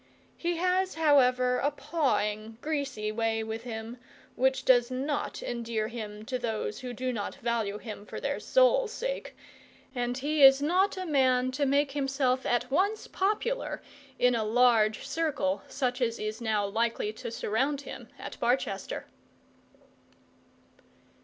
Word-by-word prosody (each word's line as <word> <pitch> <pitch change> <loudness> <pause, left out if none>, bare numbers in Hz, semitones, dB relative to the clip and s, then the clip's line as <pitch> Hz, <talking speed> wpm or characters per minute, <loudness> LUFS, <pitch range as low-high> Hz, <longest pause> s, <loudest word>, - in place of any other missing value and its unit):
He 345 0 -2
has, 365 +2 +1
however, 255 -5 +4
a 285 - +2
pawing, 225 -8 -1
greasy 275 -8 -2
way 225 0 0
with 220 +1 -4
him, 225 0 -6 0.4
which 265 +1 +1
does 245 -1 +5
not 270 +3 -3
endear 230 -2 -2
him 215 -2 -7
to 255 +2 -2
those 220 -3 -3
who 250 -1 -6
do 255 +1 -3
not 205 -3 -4
value 225 -3 -1
him 210 -1 -8
for - - -6
their - - -2
souls' - - +3
sake, - - -4 0.6
and 245 -1 -2
he 295 +3 0
is 270 0 +9
not 365 +7 +2
a 370 - -3
man 255 -4 +2
to 280 +2 0
make 280 +1 +2
himself 270 -2 0
at 245 +1 0
once 400 +8 +1
popular 430 +6 -1 0.4
in 250 0 +4
a 225 -2 +1
large 220 -1 +3
circle 265 -13 0
such 255 -1 -2
as 230 -1 +1
is 215 +2 -4
now 215 -3 +1
likely 220 +1 -1
to 220 - -6
surround 265 +6 -1
him - - -9
at - - -8
Barchester. 235 -5 -1
250 Hz, 145 wpm, -29 LUFS, 225-290 Hz, 0.6 s, is